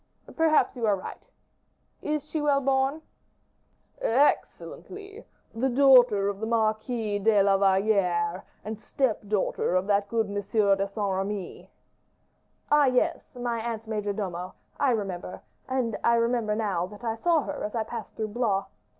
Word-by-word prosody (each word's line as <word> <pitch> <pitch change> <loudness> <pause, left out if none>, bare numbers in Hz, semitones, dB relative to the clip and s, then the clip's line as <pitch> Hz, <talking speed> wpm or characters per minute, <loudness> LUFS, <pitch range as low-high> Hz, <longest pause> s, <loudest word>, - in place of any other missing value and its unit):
"Perhaps 320 -3 +3
you 235 -3 -1
are 205 - +3
right. 185 - -9 0.7
Is 300 -1 -2
she 310 0 -3
well 290 -2 +3
born?" 270 +3 0 1.0
"Excellently; 395 - -1 0.3
the 245 +4 0
daughter 245 -6 +5
of 200 -1 -3
the 220 - -3
Marquis 220 -1 0
de 205 -1 +4
la 195 0 +4
Valliere, 190 -3 +1 0.2
and 215 0 -5
step 235 +1 -1
daughter 200 -3 0
of 185 +1 +1
that 200 0 +1
good 225 0 +1
M. 200 - -7
de 200 -1 +1
Saint 200 - -24 0.2
Remy." 195 -1 -5 1.0
"Ah, 295 -1 +6
yes! 255 0 0
my 240 -1 -2
aunt's 225 -1 -4
major 210 -2 -2
domo; 185 -3 -5 0.2
I 280 - +3
remember; 195 -6 -3 0.3
and 250 -4 -1
I 235 - +4
remember 230 -2 +1
now 195 -5 -1
that 210 +4 -13
I 225 -1 -1
saw 325 +7 +2
her - - -5
as 210 - -4
I 225 - 0
passed 225 0 -8
through 220 -1 -3
Blois. 205 -3 0
220 Hz, 150 wpm, -27 LUFS, 200-250 Hz, 1.0 s, Ah